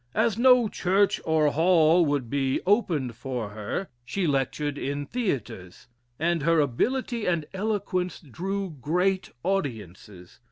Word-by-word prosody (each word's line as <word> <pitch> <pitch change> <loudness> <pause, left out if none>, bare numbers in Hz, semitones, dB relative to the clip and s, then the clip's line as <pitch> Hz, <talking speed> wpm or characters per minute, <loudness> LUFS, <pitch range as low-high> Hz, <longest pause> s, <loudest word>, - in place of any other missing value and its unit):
As 220 -1 +2
no 250 0 +5
church 195 0 +1
or 155 -2 +3
hall 165 +1 +4
would 145 -4 -1
be 135 +1 0
opened 165 - +1
for 125 -3 -4
her, 105 - -4 0.2
she 185 +10 -2
lectured 145 0 -1
in 145 +1 -3
theatres; 130 - -4 0.3
and 170 +1 0
her 165 +2 +3
ability 230 - 0
and 170 -4 0
eloquence 190 -3 -2
drew 190 - -4
great 180 +5 0
audiences. 105 - -4
160 Hz, 125 wpm, -26 LUFS, 135-195 Hz, 0.3 s, no